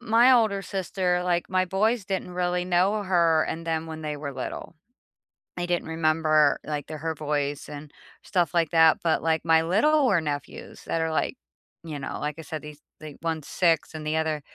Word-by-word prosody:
my 240 +1 +5
older 220 -6 +3
sister, 185 -2 -1
like, 175 -1 0
my 185 0 +2
boys 210 +4 0
didn't 190 -2 -3
really 180 0 -1
know 185 +4 +2
her 170 -4 +3
and 165 +1 -5
them 160 -1 -1
when 160 -1 -7
they 150 -1 -4
were 145 -1 -6
little. 135 +5 -6 0.8
They 175 - -1
didn't 175 -2 -1
remember, 155 -2 +2
like, 150 -2 -4
the 155 - -6
her 160 +2 -3
voice 145 -1 -2
and 145 0 -9 0.3
stuff 175 -5 0
like 165 -3 +2
that, 160 -2 +5
but 165 -2 +1
like 160 0 0
my 160 -1 +4
littler 220 - +3
nephews 145 -2 -6
that 165 - -1
are 160 - -1
like, 160 - -1 0.5
you 155 -3 -6
know, 130 - -5
like 150 0 -2
I - - -5
said 155 +1 -6
these 150 -1 -11 0.2
they 150 -2 -9
one's 160 -2 -3
6 165 -5 +1
and 155 -1 -6
the 155 - 0
other, 160 -1 -1
165 Hz, 195 wpm, -26 LUFS, 155-180 Hz, 0.8 s, my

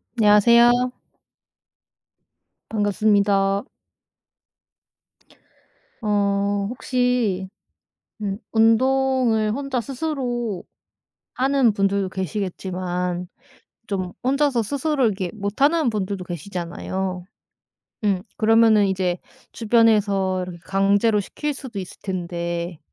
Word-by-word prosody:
안녕하세요. 235 +3 +5 1.8
반갑습니다. 200 -2 +2 2.4
어, 200 -1 0
혹시 245 -6 0 0.7
음 200 -2 -2
운동을 235 -1 +3
혼자 270 +1 -2
스스로 245 - -3 0.7
하는 265 -3 +2
분들도 195 -1 0
계시겠지만 180 -1 -3 0.6
좀 185 -3 -3
혼자서 270 -2 +2
스스로를 285 +3 0
이렇게 190 -4 -2
못하는 270 +9 +1
분들도 200 -3 -3
계시잖아요. 180 +1 -5 0.8
음 195 -3 +1 0.2
그러면은 220 -1 +5
이제 185 -2 -1 0.3
주변에서 210 -5 +2
이렇게 180 -1 -7
강제로 200 +3 +2
시킬 295 +9 -4
수도 260 -6 -7
있을 185 -2 -7
텐데 170 -2 -4
205 Hz, 205 characters per minute, -22 LUFS, 190-240 Hz, 2.4 s, 안녕하세요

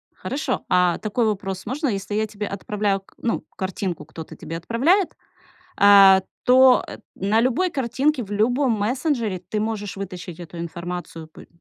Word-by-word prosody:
Хорошо. 270 -2 -3
А 180 -1 +3
такой 225 +2 0
вопрос 195 -3 -3
можно, 285 +3 -2
если 195 -2 -3
я 220 0 0
тебе 210 0 -5
отправляю 200 0 -2
к 195 - -26
ну, 230 - -2
картинку 185 -4 -3
кто-то 160 +1 -10
тебе 165 - -6
отправляет, 280 - +1 0.6
а, 195 -1 +8 0.2
то, 255 0 +6
э, - - -8 0.2
на 200 +4 +1
любой 260 +10 +1
картинке, 270 +1 0
в 205 - -11
любом 245 +5 +2
мессенджере 225 - -1
ты 210 - -1
можешь 210 -2 -3
вытащить 180 -3 -7
эту 175 0 -9
информацию? 170 -1 -6
Пы 160 - -15
205 Hz, 155 wpm, -22 LUFS, 185-245 Hz, 0.6 s, а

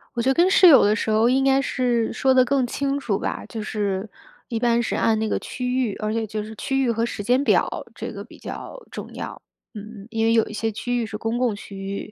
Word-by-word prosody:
我 235 - 0
觉 260 - +1
得 - - +4
跟 350 +5 +4
室 370 - +7
友 290 - +8
的 205 +1 +4
时 220 - -2
候， 220 +2 +4
应 265 +1 +3
该 270 0 +3
是 245 -4 0
说 265 -1 +2
得 255 -1 +6
更 265 -1 +1
清 280 +2 -1
楚 205 -7 -1
吧。 - - -4
就 225 - -6
是 205 -1 -2 0.4
一 230 -2 -2
般 235 -1 +2
是 - - -2
按 225 -1 +2
那 220 -1 -1
个 - - 0
区 250 -1 -4 0.2
域， - - -5
而 215 0 -2
且 225 -1 -1
就 215 0 -4
是 220 +1 -9
区 270 +4 -1
域 240 - +2
和 230 +1 0
时 205 -3 -5
间 250 +5 +3
表， - - +4 0.3
这 - - -5
个 - - -7
比 - - -15
较 - - -8
重 - - -8
要， - - -7 0.3
嗯。 210 -1 -9
因 225 0 0
为 225 - +3
有 225 - +4
一 215 - -8
些 225 +1 -1
区 245 +3 -2
域 - - -2
是 215 -1 -6
公 225 +2 -2
共 245 -4 +1
区 200 -1 -10
域， 195 +2 -5
230 Hz, 280 characters per minute, -23 LUFS, 215-255 Hz, 0.4 s, 友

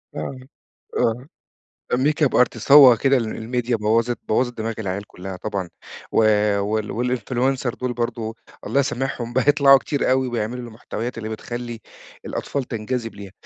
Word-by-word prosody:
آه، - - -4 0.6
آه، 120 +3 0 0.7
makeup 150 +2 +2
artist 125 - -4
هو 135 -5 +10
كده 135 +4 +3
ال 115 +1 -2
الMedia 120 +1 -1
بوّظِت 115 +2 +1
بوّظِت 120 +2 0
دماغ 115 +1 -2
العيال 100 -1 -4
كُلّها 95 0 -8
طبعًا، 95 -2 -4 0.4
و - - +1 0.4
وال 110 +4 -1
والInfluencer 130 +1 -1
دُول 125 -1 -1
برضه 115 -2 -3 0.3
الله 140 - +2
يسامحهم 135 -4 -2
بقوا 130 +2 +1
يطلعوا 140 -1 +7
كتير 140 0 -1
أوي، 130 0 +2
وبيعملوا 120 +1 -3
المحتويات 115 +1 -6
اللي 110 -1 -5
بتخَلّي 120 +1 -6 0.5
الأطفال 140 -2 -3
تنجذب 115 0 -4
ليها، 100 -1 -10
120 Hz, 145 wpm, -22 LUFS, 110-130 Hz, 0.7 s, هو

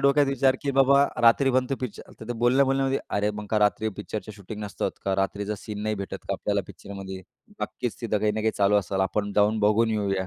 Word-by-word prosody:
डोक्यात 140 +1 +4
विचार 135 -1 +2
की, 140 - 0
"बाबा, 140 +1 +6 0.2
रात्री 120 +4 +5
बनतो 130 +1 +1
पिक्च" 125 -5 -5 0.2
तर - - -7
ते - - -1
बोलणं 130 +3 +5
बोलल्यामध्ये, 135 0 +1 0.2
"अरे, 105 +1 +1
मग 105 - -8
का 110 - +3
रात्री 105 +1 +2
पिक्चरच्या 105 0 -6
शूटिंग 105 +2 -8
नसतात 100 - -2
का? 95 -1 +1
रात्रीचा 100 +2 -3
सीन 105 -1 -6
नाही 110 0 0
भेटत - - -5
का - - +1
आपल्याला - - -1
पिक्चरमध्ये?" 95 -1 -8 0.4
नक्कीच - - -4
तिथं 105 - 0
काही 105 0 +1
ना 110 - -2
काही 110 - +2
चालू 100 0 +4
असेल, 95 +2 -2
आपण 100 -1 -2
जाऊन 105 +2 +3
बघून 110 +2 +3
येऊया. 100 -3 -1
110 Hz, 215 wpm, -26 LUFS, 100-130 Hz, 0.4 s, बाबा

